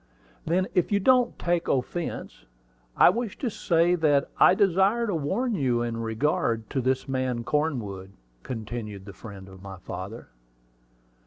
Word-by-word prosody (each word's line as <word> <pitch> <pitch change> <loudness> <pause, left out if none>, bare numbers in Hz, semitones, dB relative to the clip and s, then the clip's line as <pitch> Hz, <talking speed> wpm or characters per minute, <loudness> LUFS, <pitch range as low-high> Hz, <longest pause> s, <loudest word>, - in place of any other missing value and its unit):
"Then 180 +3 +2
if 180 - +1
you 200 - +3
won't 250 -2 +4
take 175 -1 0
offence, 135 - -3 0.5
I - - +7
wish 230 0 -4
to 250 -5 -2
say 170 -3 +2
that 150 -5 +2
I - - +7
desire 195 +5 +3
to 205 - -1
warn 195 - -1
you 125 - +1
in 120 -1 -3
regard 115 -1 0
to 135 - 0
this 130 +2 0
man 130 -3 -1
Cornwood," 115 -11 -2 0.3
continued 105 - -6
the 100 - -9
friend 95 0 -10
of 95 -1 -13
my 95 -1 -9
father. 100 +5 -8
135 Hz, 150 wpm, -26 LUFS, 110-180 Hz, 0.5 s, I